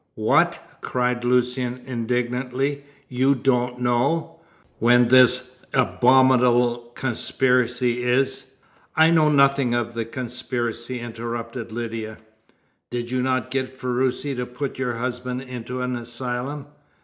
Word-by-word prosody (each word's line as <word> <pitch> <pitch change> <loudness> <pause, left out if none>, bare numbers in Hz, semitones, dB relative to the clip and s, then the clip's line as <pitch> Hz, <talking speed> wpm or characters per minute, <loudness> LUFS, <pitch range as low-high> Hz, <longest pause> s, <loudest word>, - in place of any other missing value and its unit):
"What?" - - +2 0.2
cried 125 -1 -1
Lucian 125 0 0
indignantly. 125 +3 -2 0.2
"You 130 +2 +2
don't 125 -1 0
know 125 +7 0 0.4
when 120 +1 +4
this 125 0 +5 0.2
abominable 125 -2 +3
conspiracy 125 -1 0
is 130 +2 0 0.3
" - - -32
"I 160 +1 +5
know 155 -2 +4
nothing 140 -3 +3
of 120 0 -2
the 115 -1 -3
conspiracy," 120 0 -4
interrupted 115 0 -6
Lydia. 115 -1 -5 0.7
"Did 120 0 -4
you 130 0 0
not 130 0 -1
get 130 -1 -2
Ferruci 130 +2 -1
to 125 0 -3
put 130 +2 -5
your 125 -3 -1
husband 125 +1 -4
into 125 0 -6
an 125 0 -2
asylum?" 125 +4 -5
125 Hz, 115 wpm, -23 LUFS, 120-130 Hz, 0.7 s, this